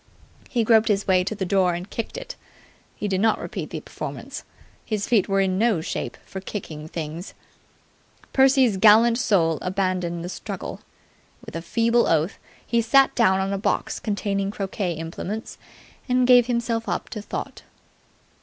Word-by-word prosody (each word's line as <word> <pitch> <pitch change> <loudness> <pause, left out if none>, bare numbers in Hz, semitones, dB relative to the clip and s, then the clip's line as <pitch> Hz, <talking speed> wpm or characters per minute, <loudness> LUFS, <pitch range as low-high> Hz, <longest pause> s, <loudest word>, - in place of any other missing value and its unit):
He 235 -2 +1
groped 225 0 +4
his 205 -2 +1
way 185 -1 +4
to 190 +4 -3
the 195 -2 -2
door 185 -2 +2
and 175 +2 -6
kicked 230 - -5
it. - - -7 0.6
He 210 - -3
did 190 -1 0
not 225 0 +3
repeat - - -5
the - - -5
performance. - - -7 0.4
His 210 -2 -2
feet 215 -5 +2
were 195 0 +3
in 190 -1 0
no 225 -5 +3
shape 160 - -4
for 190 - -7
kicking 155 -6 -6
things. 160 +2 -6 1.0
Percy's 265 -5 +4
gallant 225 +4 +6
soul 165 - +2
abandoned 180 -2 -1
the - - -5
struggle. - - -6 0.6
With - - -10
a 165 - -3
feeble 230 +7 +2
oath, 165 +4 +1 0.3
he 235 -1 +1
sat 265 +4 +4
down 190 -5 +3
on 195 +1 -1
a 195 - -2
box - - -1
containing 200 -1 -1
croquet 195 -2 -3
implements, 165 +7 -6 0.5
and 250 0 +3
gave 245 -1 +6
himself 235 -2 -1
up - - -2
to 210 - -6
thought. - - -6
200 Hz, 165 wpm, -24 LUFS, 185-230 Hz, 1.0 s, gallant